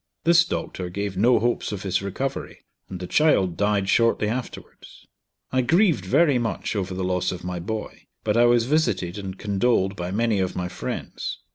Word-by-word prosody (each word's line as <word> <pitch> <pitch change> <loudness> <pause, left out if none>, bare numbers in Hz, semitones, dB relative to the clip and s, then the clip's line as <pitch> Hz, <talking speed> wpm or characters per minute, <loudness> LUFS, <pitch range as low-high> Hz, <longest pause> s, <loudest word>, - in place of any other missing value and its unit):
This 170 +1 +5
doctor 90 - -4
gave 100 +1 -4
no 120 +6 +4
hopes 120 0 0
of 105 -2 -5
his 95 -2 0
recovery, 130 +8 -5 0.2
and 90 - -6
the 90 - -5
child 95 - +3
died 100 -1 +1
shortly 115 0 +3
afterwards. 120 +3 -7 0.5
I 130 - +2
grieved 160 - +3
very 145 - +3
much 115 -1 -3
over 95 -2 -2
the 95 - -3
loss 90 -1 0
of 90 -2 -7
my 90 0 -4
boy; 110 +5 -6 0.2
but - - 0
I 120 +1 +5
was 120 -1 +4
visited 120 - 0
and 95 -1 -6
condoled 100 -1 +1
by 90 -2 -4
many 110 +1 +1
of 95 -1 -1
my 90 0 -3
friends. - - -5
105 Hz, 180 wpm, -24 LUFS, 95-120 Hz, 0.5 s, This